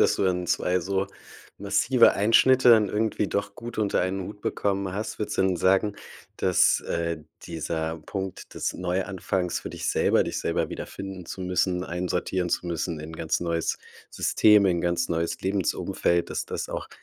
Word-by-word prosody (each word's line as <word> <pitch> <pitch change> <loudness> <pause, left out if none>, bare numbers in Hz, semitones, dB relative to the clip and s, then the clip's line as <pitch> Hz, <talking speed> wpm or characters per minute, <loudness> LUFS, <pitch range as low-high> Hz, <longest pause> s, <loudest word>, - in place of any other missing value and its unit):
dass - - +4
du - - +1
dann 90 -1 0
2 90 +1 +1
so 95 +2 -1 0.5
massive 100 +5 +4
Einschnitte 125 +5 +5
dann 110 -3 +6
irgendwie 105 0 0
doch 100 0 -2
gut 120 -1 -8
unter 105 -2 +1
einen 95 +1 -2
Hut 105 +1 -9
bekommen 100 -2 -1
hast. 110 +2 -4
Würdest 105 - -3
du - - +5
denn 95 -2 +2
sagen, 95 +3 +2 0.4
dass, 90 -1 +3
äh, 85 -1 -2 0.3
dieser 80 0 -3
Punkt 95 +3 -6
des - - -2
Neuanfangs 90 0 -2
für - - -7
dich - - -4
selber, - - +3
dich - - -3
selber - - -1
wiederfinden 95 -2 -7
zu 95 - -7
müssen, 90 0 0
einsortieren 90 +1 -2
zu 90 - -1
müssen 85 -1 -3
in 80 +2 -8
ganz 80 0 -1
neues 85 -2 -1 0.3
System, 105 -2 +4
in 85 -2 +2
ganz 85 0 0
neues 85 0 -1
Lebensumfeld, 95 -2 0
dass - - -2
das - - -4
auch - - -5
95 Hz, 170 wpm, -26 LUFS, 85-100 Hz, 0.5 s, dann